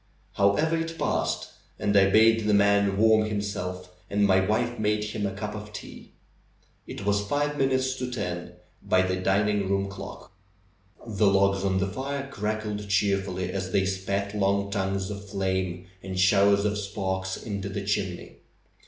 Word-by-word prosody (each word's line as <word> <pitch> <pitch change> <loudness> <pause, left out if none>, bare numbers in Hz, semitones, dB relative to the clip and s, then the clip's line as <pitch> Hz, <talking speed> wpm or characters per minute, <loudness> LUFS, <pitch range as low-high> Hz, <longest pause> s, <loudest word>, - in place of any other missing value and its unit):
However, 125 +12 +2
it 165 0 -3
passed, - - -1 0.3
and 100 - 0
I 95 -1 +6
bade 110 +1 +4
the 105 - +4
man 100 -1 +3
warm 110 0 +5
him 105 -1 -1
self, 90 -3 -5 0.2
and 100 0 +2
my 95 -1 +4
wife 115 +5 0
made 105 0 +1
him 105 -1 -2
a - - -3
cup 105 +1 -4
of 105 0 -8
tea. 105 - -10 0.7
It - - -7
was 100 0 +1
five 145 +2 0
minutes 130 -2 +1
to 125 0 -3
ten 90 -7 -4 0.3
by 95 0 +2
the 95 0 -1
dining 100 +1 +1
room 100 0 0
clock. 100 -1 -9 0.7
The 105 -2 +1
logs 100 0 +3
on 95 -1 +1
the 95 - +1
fire 135 +7 -4
crackled 105 -2 -3
cheerfully 100 -2 0
as 95 0 -4
they 95 +1 +2
spat 100 +1 -2
long 100 0 +1
tongues 95 -1 -1
of 100 0 -8
flame 95 -2 -2 0.2
and 95 -1 -5
showers 100 +1 +4
of 105 0 0
sparks 95 -2 -3
into 100 -3 -5
the 100 0 -4
chimney. 95 -3 -3
100 Hz, 165 wpm, -26 LUFS, 95-105 Hz, 0.7 s, I